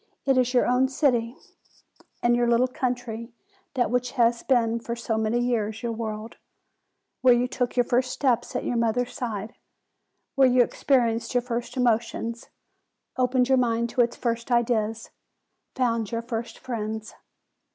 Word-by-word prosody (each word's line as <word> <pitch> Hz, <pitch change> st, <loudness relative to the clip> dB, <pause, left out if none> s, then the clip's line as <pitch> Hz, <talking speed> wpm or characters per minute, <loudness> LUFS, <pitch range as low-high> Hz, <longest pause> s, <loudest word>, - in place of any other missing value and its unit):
It 270 Hz, -1 st, +3 dB
is 250 Hz, -1 st, +2 dB
your 250 Hz, -1 st, +3 dB
own 250 Hz, +2 st, +3 dB
city, 255 Hz, -4 st, 0 dB, 0.9 s
and 240 Hz, 0 st, +4 dB
your 240 Hz, 0 st, +2 dB
little 240 Hz, +2 st, +3 dB
country 245 Hz, -4 st, -4 dB, 0.4 s
that 245 Hz, -2 st, +1 dB
which 250 Hz, 0 st, 0 dB
has 235 Hz, -2 st, +2 dB
been 235 Hz, -3 st, +2 dB
for 235 Hz, 0 st, -4 dB
so 230 Hz, -1 st, -2 dB
many 220 Hz, +2 st, 0 dB
years 225 Hz, -2 st, -1 dB
your 235 Hz, -, -1 dB
world; 220 Hz, 0 st, -5 dB, 0.8 s
where 250 Hz, -1 st, +6 dB
you 245 Hz, +1 st, +1 dB
took 250 Hz, 0 st, -2 dB
your 245 Hz, -, +5 dB
first 250 Hz, +2 st, +1 dB
steps 245 Hz, -4 st, 0 dB
at -, -, -1 dB
your 245 Hz, -, -1 dB
mother's 235 Hz, +2 st, 0 dB
side; 220 Hz, -2 st, -4 dB, 0.8 s
where 270 Hz, -2 st, +5 dB
you 250 Hz, -1 st, +5 dB
experienced 235 Hz, -2 st, 0 dB
your 245 Hz, -, +3 dB
first 240 Hz, +1 st, -4 dB
emotions, 235 Hz, -1 st, -1 dB, 0.7 s
opened 250 Hz, 0 st, +2 dB
your 265 Hz, -1 st, +4 dB
mind 235 Hz, -1 st, 0 dB
to 250 Hz, -, +2 dB
its 235 Hz, 0 st, +1 dB
first 235 Hz, -1 st, -2 dB
ideas, 230 Hz, -2 st, 0 dB, 0.6 s
found 230 Hz, -4 st, 0 dB
your 230 Hz, 0 st, -2 dB
first 230 Hz, 0 st, -5 dB
friends. 220 Hz, -2 st, -5 dB
240 Hz, 155 wpm, -25 LUFS, 230-250 Hz, 0.9 s, where